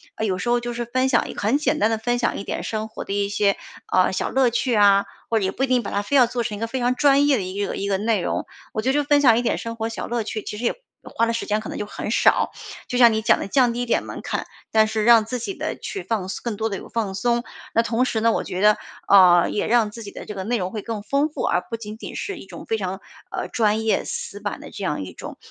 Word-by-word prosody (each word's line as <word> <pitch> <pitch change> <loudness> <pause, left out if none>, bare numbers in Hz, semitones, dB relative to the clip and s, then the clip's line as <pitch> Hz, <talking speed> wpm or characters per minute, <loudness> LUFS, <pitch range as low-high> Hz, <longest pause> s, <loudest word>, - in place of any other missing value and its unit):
呃 220 - -2
有 190 -3 0
时 185 - -4
候 240 0 +3
就 240 0 -4
是 240 0 -3
分 255 +2 +1
享 235 - +2
一 - - -5
个 - - -6
很 215 +7 +2
简 300 - 0
单 215 - +3
地 225 - 0
分 240 +2 0
享 235 - 0
一 - - -5
点 - - -3
生 220 0 -3
活 220 - -7
的 - - -8
一 200 0 0
些 200 -1 +2 0.3
啊 185 0 +3
小 185 - -1
乐 265 -2 +3
趣 240 +1 0
啊， 200 -1 +5 0.2
或 225 - +2
者 195 - -1
也 190 - 0
不 260 - -3
一 - - +2
定 250 -1 +2
把 - - -5
它 200 - 0
非 205 +8 -2
要 260 -3 +7
做 240 0 -2
成 215 -3 -4
一 - - -9
个 230 - -1
非 260 +3 -3
常 245 +1 +1
专 280 +1 +4
业 285 - +4
的 - - -2
一 195 +2 -3
个 - - -4
一 200 - -3
个 195 - +2
内 215 0 +1
容。 - - -2 0.3
我 215 - -1
觉 255 - 0
得 - - +2
就 295 +1 +2
分 290 0 +4
享 235 -5 +6
一 - - +2
点 245 - 0
生 230 0 -5
活 225 0 -3
小 225 - -5
乐 235 -1 -1
趣， 215 0 -4
其 210 - -6
实 230 - -6
也 - - +2 0.3
花 230 - 0
的 230 - 0
时 230 - -2
间 210 0 0
可 215 - -7
能 - - -5
就 210 - -3
很 210 - -6
少， 225 - +3 0.4
就 250 - -2
像 240 -2 +7
你 220 - 0
讲 220 - +4
的 - - -4
降 245 +2 +3
低 245 +1 -2
一 - - -3
点 235 - +1
门 - - -7
槛。 - - -3 0.2
但 220 -1 +4
是 215 0 -1
让 230 -2 +7
自 250 +3 -3
己 390 - -4
呢 - - -4
去 395 -3 -6
放 210 -5 -2
松 190 - -5
更 235 -3 -2
多 220 - 0
地 200 - -3
有 - - -10
放 215 -4 -2
松。 235 +4 +1 0.3
那 230 - +4
同 230 +1 +1
时 225 - -1
呢， 230 0 +4
我 - - -1
觉 180 - -5
得， 210 0 +5 0.3
呃 180 -3 +7
也 210 - -1
让 230 -2 +3
自 230 - -9
己 200 - -8
的 - - -9
这 210 - -6
个 190 -2 -5
内 235 +5 0
容 185 -2 -3
会 215 - -4
更 220 -2 -5
丰 280 +8 +1
富。 300 - -5
而 - - +2
不 230 - -3
仅 215 -1 -8
仅 - - -8
是 400 -3 -4
一 - - -10
种 - - -10
非 225 - -1
常 190 0 -3 0.3
呃 - - -3
专 220 -1 +1
业、 220 - +2
死 205 - -5
板 205 -1 -4
的 - - -11
这 200 - -7
样 150 - -1
一 95 - -8
种， - - -9
225 Hz, 340 characters per minute, -23 LUFS, 205-240 Hz, 0.4 s, 要